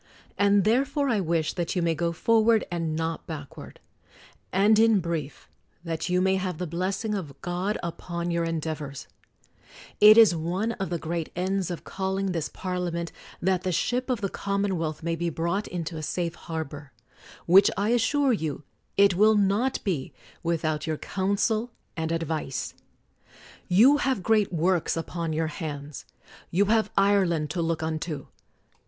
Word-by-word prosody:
And 200 -1 +4
therefore 275 - +1
I 225 -4 +2
wish 165 -3 0
that 175 0 -2
you 180 - +1
may 165 -1 +2
go 170 +1 -1
forward 225 +5 +3
and 165 -2 -2
not 165 +1 -3
backward; 150 -4 -8 0.7
and 210 +3 +4
in 225 -2 +5
brief 165 -6 -4 0.4
that 165 +1 -3
you 180 0 +2
may 190 0 +3
have 185 -3 -3
the 180 - -3
blessing 185 +6 -2
of 155 -9 -5
God 180 +4 -1
upon 170 0 -4
your 170 0 0
endeavors! 155 -4 -4 0.9
It 215 +1 +9
is 220 -6 +7
one 180 +8 -1
of 195 -4 -4
the 175 - -1
great 165 0 -3
ends 185 +1 -1
of 175 - -5
calling 190 0 -2
this 165 -4 -2
Parliament 175 -2 -3 0.3
that 185 0 +2
the 185 - -1
ship 250 +9 -1
of 245 -4 0
the 195 - -1
commonwealth 190 -7 -2
may 165 0 -1
be 170 +1 -1
brought 170 +6 -2
into 165 -2 -4
a - - -5
safe 170 +2 -2
har 160 -2 -4
bor; 145 -2 -11 0.5
which, 195 +4 +7
I 205 +2 +1
assure 260 +3 +2
you, 155 -7 -3 0.3
it 200 -1 +6
will 215 +4 +5
not 205 +6 +1
be, 165 - -2 0.3
without 160 -2 -1
your 155 -1 -1
counsel 205 +6 0 0.3
and 160 -1 -2
advice. 160 -4 -3 0.9
You 235 +11 +6
have 265 -9 0
great 215 -1 +2
works 175 0 +1
upon 165 0 -3
your 160 +1 0
hands. 150 -2 -6 0.4
You 195 +4 +2
have 220 +1 +2
Ireland 185 -6 +2
to 170 - -2
look 165 -1 -1
unto. 155 -2 -3
175 Hz, 160 wpm, -26 LUFS, 165-200 Hz, 0.9 s, It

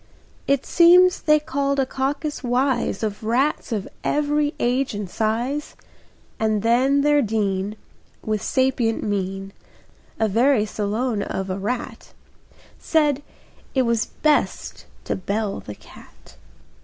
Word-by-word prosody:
It 275 -1 +1
seems 360 +1 +6
they 305 -1 +4
called 280 -1 -1
a 270 - +3
caucus 280 +3 -3
wise 245 -1 0
Of 210 0 -3
rats 250 +6 0
of 210 -4 -2 0.2
every 295 0 0
age 250 0 0
and 205 -1 -4
size, 235 +9 -2 0.6
And 215 -2 0
then 260 +5 +3
their 295 0 +4
dean, 205 -2 -1 0.5
With 215 -2 -1
sapient 260 -3 0
mien, 195 -1 -3 0.7
A 220 - +2
very 230 +2 +3
Solon 215 +2 -2
of 190 -1 -3
a 185 - -3
rat, 235 +5 -5 0.7
Said 295 -3 +1 0.5
it 260 - +3
was 235 -2 0
best 305 -1 -1 0.2
to - - -2
bell 200 +2 -2
the 105 - -9
cat. - - -17
240 Hz, 125 wpm, -22 LUFS, 210-280 Hz, 0.7 s, seems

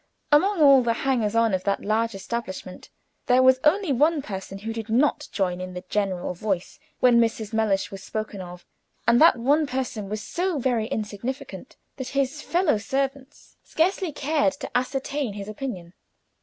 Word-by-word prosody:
Among 370 +6 +4
all 275 -2 +8
the 235 -1 +1
hangers 230 -5 +1
on 230 -2 +3
of 185 -1 0
that 200 -1 0
large 220 +1 0
establishment 190 -3 -6 0.4
there 250 +1 +5
was 260 0 +6
only 335 0 +3
one 295 +3 +2
person 195 -2 -6
who 220 +3 -5
did 225 -1 -6
not 260 +6 +2
join 180 -2 -1
in 185 0 -7
the 180 - -6
general 190 -4 -1
voice 185 0 -3 0.2
when 245 -2 +6
Mrs. 225 -1 0
Mellish 215 -3 +1
was 195 -1 -8
spoken 215 -2 -5
of, 180 0 -10 0.4
and 235 +3 +5
that 320 -5 +7
one 285 +6 +2
person 250 -6 -3
was 215 0 -4
so 355 +3 -2
very 240 -4 0
insignificant 220 +5 -5 0.2
that 260 -2 -5
his 275 +2 0
fellow 340 - +1
servants 270 +4 -4
scarcely 365 +1 0
cared 290 0 +1
to - - -9
ascertain 270 -1 -1
his 200 0 -7
opinion. 205 -6 -6
235 Hz, 170 wpm, -25 LUFS, 205-275 Hz, 0.4 s, all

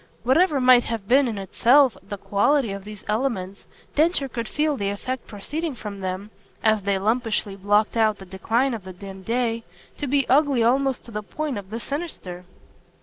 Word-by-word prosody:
Whatever 290 +4 +3
might 250 -1 +6
have 225 -4 -4
been 270 +3 +5
in 225 -3 -3
itself 240 +6 +4
the 200 +1 -7
quality 220 +5 +1
of 195 0 -6
these 210 -1 -10
elements 210 -4 -2 0.3
Densher 310 -2 +2
could 235 -3 -4
feel 300 +3 0
the 200 -5 -2
effect 255 +5 -4
proceeding 295 +9 -4
from 210 -3 -7
them, 190 +2 -4 0.3
as 220 -2 +3
they 200 0 0
lumpishly 215 -1 0
blocked 205 +3 +2
out 220 -2 +3
the 190 - -11
decline 225 +8 0
of 220 -4 -5
the 185 0 -9
dim 195 +1 -10
day, 230 +2 -1 0.4
to 290 - -2
be 275 0 +1
ugly 275 -3 +3
almost 265 +2 +1
to 235 - -11
the 210 -1 -3
point 270 - -4
of 190 -1 -12
the 225 +2 -4
sinister. 235 - -6
225 Hz, 185 wpm, -24 LUFS, 200-270 Hz, 0.4 s, might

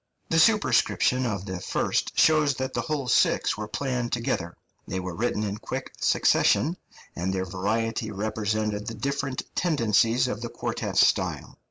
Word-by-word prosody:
The 165 - +4
superscription 130 - +3
of 100 -4 -3
the 95 -2 -5
first - - -1
shows 155 -3 +4
that 130 0 -3
the - - -1
whole 150 -4 -3
six - - +3
were 105 0 -5
planned 125 +1 -2
together; 95 -7 -2 0.3
they 95 - -3
were 90 -1 -5
written 110 +2 -1
in 100 0 -3
quick - - -6
succession, 170 +4 +3 0.4
and 90 +2 -2
their 95 -1 -2
variety 110 +4 -2
represented 105 0 -2
the 115 - -4
different 140 -1 -2
tendencies 120 - +2
of 115 -3 -4
the 120 - -4
quartet - - -4
style. - - +2
115 Hz, 155 wpm, -26 LUFS, 105-130 Hz, 0.4 s, The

